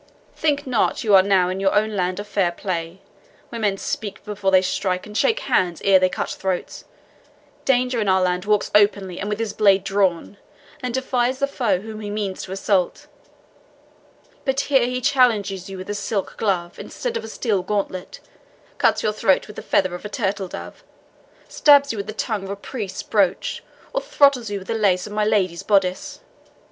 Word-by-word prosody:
Think 290 -2 0
not 250 -4 0
you 215 -3 +2
are 190 - +9
now 185 -2 +2
in 185 +1 -3
your 195 0 +1
own 215 +1 +1
land 185 0 -1
of 205 - -6
fair 190 -4 +1
play, 175 0 -4 0.5
where 230 - -6
men 200 -2 +1
speak 205 0 -5
before 205 -2 -1
they 190 -1 +5
strike, 185 0 -1
and 210 0 -11
shake 450 - +2
hands 175 - +1
ere 195 -1 +6
they 185 0 +3
cut - - -3
throats. 190 -2 -4 0.8
Danger 250 -2 +2
in 205 - 0
our 190 0 +3
land 180 +1 0
walks 210 -1 +1
openly, 200 -3 +2
and 205 - -3
with 210 - -1
his 225 -1 -3
blade 195 -2 +4
drawn, 195 -1 0 0.4
and 250 -1 -3
defies 255 -1 0
the 280 - +1
foe 235 -9 0
whom 215 0 -8
he 205 - -5
means 205 -2 -3
to 185 - -8
assault; 190 -1 0 1.4
but 270 0 0
here 270 -4 +2
he 250 0 -2
challenges 215 -9 +2
you 195 - -7
with 185 - -8
a 205 - -3
silk 205 -1 -3
glove 180 -5 -2
instead 485 -2 -5
of - - -3
a - - -7
steel 220 -3 -1
gauntlet, 185 -1 -4 0.6
cuts - - +2
your 215 - +1
throat 205 -3 +2
with 210 - -12
the - - -6
feather 185 -2 +1
of 175 - -7
a 210 - -6
turtle 200 -3 -2
dove, - - -9 0.6
stabs 285 -2 +5
you - - -6
with 200 - -5
the - - -4
tongue 215 -2 -3
of - - -8
a 200 - -3
priest's 200 -1 -6
brooch, 195 -3 0 0.3
or - - 0
throttles 280 - +3
you 205 - -3
with 190 -1 -10
the - - -1
lace 195 -5 +2
of 210 - -8
my 210 0 +1
lady's 185 -5 +1
boddice. 190 -3 0
205 Hz, 200 wpm, -22 LUFS, 190-225 Hz, 1.4 s, are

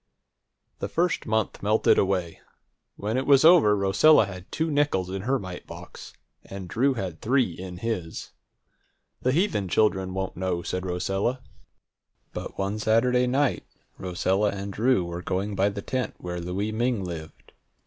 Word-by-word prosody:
The - - -2
first 175 -4 0
month 110 -1 -1
melted 105 +2 +3
away. 95 -4 -1 0.6
When 110 +4 -2
it 130 - -2
was 140 +1 +6
over, 155 -12 +7
Rosella 105 +8 +5
had 95 -1 -10
two 160 0 -1
nickels 145 -11 +1
in 95 0 -3
her 130 +6 +1
mite 95 -6 -8
box, - - -10 0.3
and 95 -2 -8
Drew 130 +9 +1
had 95 -7 -5
three 125 -4 +2
in 90 +1 -8
his. 95 -6 -4 0.9
"The 130 - +2
heathen 145 - +1
children 95 -1 +1
won't 95 0 -3
know," 90 -1 -2
said 90 +1 -3
Rosella. 95 +8 -1 0.9
But - - -6
one 100 +2 -2
Saturday 125 +3 +3
night 135 +1 +1 0.4
Rosella 95 +3 0
and 100 0 -5
Drew 115 -3 +2
were 85 0 -5
going 95 +4 -2
by 100 +1 +2
the 100 0 -6
tent 130 -1 -2
where 90 -1 -5
Louie 95 +5 -2
Ming 115 -1 0
lived. 80 -3 -8
100 Hz, 155 wpm, -26 LUFS, 95-125 Hz, 0.9 s, over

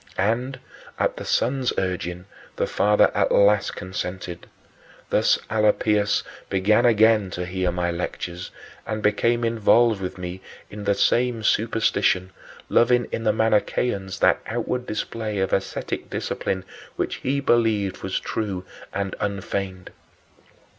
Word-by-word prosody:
And, 120 +6 0 0.4
at - - 0
the - - -6
son's 130 +1 +1
urging, 90 -1 -2 0.3
the - - 0
father 105 0 +3
at - - +1
last 100 0 +4
consented. 90 -1 -5 0.6
Thus - - +4
Alypius 105 -1 +2 0.3
began 105 +5 +3
again 110 -3 +4
to 90 0 -4
hear 90 0 -1
my 85 0 -1
lectures 85 +1 -5 0.4
and 110 -1 -3
became 115 +3 +2
involved 115 -1 +3
with 90 0 -4
me 90 +1 -6 0.3
in 105 0 -7
the 100 0 +2
same 120 +1 +2
superstition, 105 -4 +1 0.4
loving 120 0 +3
in 115 - -3
the 110 - +5
Manicheans 105 -2 0
that - - +4
outward 125 0 -2
display 110 0 -3
of 95 0 0
ascetic 95 - -2
discipline 95 0 -3 0.3
which - - -2
he 140 +2 -1
believed 110 -7 +1
was 95 - -2
true 100 -5 -3 0.3
and 100 -1 -3
unfeigned. 100 -2 -3
105 Hz, 125 wpm, -24 LUFS, 95-115 Hz, 0.6 s, the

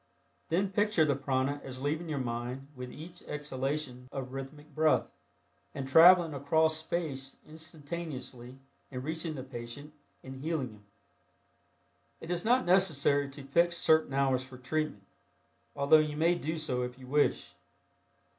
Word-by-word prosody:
Then 190 +4 +1
picture 205 -4 +3
the 145 -2 +2
prana 135 +1 -1
as 130 -1 -7
leaving 160 +4 -1
your 150 - -2
mind 125 +2 -4
with 125 -1 -7
each 170 +3 -10
exhalation 135 -3 -3
of 130 -1 -5
rhythmic 145 +3 -8
breath, 155 +1 +3 0.7
and 135 -1 -4
traveling 170 +3 +7
across 160 +3 +2
space 155 -5 -3
instantaneously 145 -5 -7 0.3
and 125 -2 -6
reaching 160 +1 -3
the 130 - -5
patient 130 +3 -8 0.3
and 130 0 -8
healing 140 -3 -2
him. 105 -1 -17 1.3
It 165 - -7
is 175 -1 -1
not 250 +3 +3
necessary 155 -6 +3
to 140 0 -9
fix 170 +5 +2
certain 155 -4 +3
hours 135 -2 +2
for 130 -1 -12
treatment, 145 -3 -2 0.7
although 145 +3 +6
you 150 -1 -1
may 165 +3 +4
do 165 -1 -3
so 140 -6 -1
if 125 0 -4
you 130 - -12
wish. 145 +3 +1
145 Hz, 145 wpm, -31 LUFS, 130-160 Hz, 1.3 s, traveling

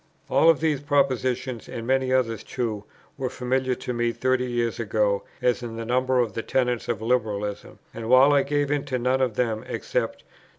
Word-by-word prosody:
All 165 - +5
of 160 -3 +4
these 155 -4 +1
propositions, 130 -4 0
and 115 - -6
many 130 +1 +1
others 120 -4 +1
too, 110 -5 -3 0.3
were 130 -1 -1
familiar 130 0 -1
to 125 0 -5
me 120 0 0
thirty 130 +1 0
years 120 -2 -1
ago, 105 -2 +1 0.2
as 125 0 +2
in 115 -2 -6
the 115 0 -5
number 130 +2 +1
of 115 -5 0
the 115 - -3
tenets 125 -1 0
of 110 -2 -2
Liberalism, 105 -4 -2 0.2
and, 115 0 -6
while 130 +3 +7
I 140 - +5
gave 145 0 0
into 140 -3 -1
none 130 +2 +1
of 125 -5 0
them 115 -3 -1
except - - -3
No. - - -35
125 Hz, 195 wpm, -25 LUFS, 115-130 Hz, 0.3 s, while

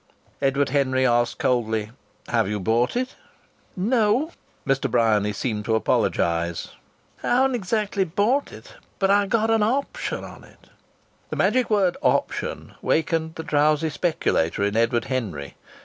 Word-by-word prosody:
Edward 140 0 +1
Henry 130 -1 +1
asked 120 -1 +2
coldly: 110 -3 0 0.4
"Have 115 -4 +2
you 105 0 -2
bought 115 - +1
it?" 255 +1 -2 0.6
"No," 230 - +2 0.3
Mr. 135 0 +1
Bryany 110 -3 +2
seemed 105 0 -3
to 110 - +1
apologize. 85 -5 0 0.5
"I - - -4
haven't 265 +2 +3
exactly 210 -2 0
bought 210 - 0
it. - - -13 0.2
But 195 0 +2
I've 200 0 +3
got 225 0 +2
an 225 -1 +3
option 275 - -1
on - - -11
it." - - -20 0.6
The - - -4
magic 255 -2 +2
word 195 -5 +2
"option" - - -1
wakened 160 0 0
the 160 - -5
drowsy 150 +1 +2
speculator 145 - 0
in 100 +1 0
Edward 115 +1 +2
Henry. 100 - -4
145 Hz, 140 wpm, -23 LUFS, -, 0.6 s, haven't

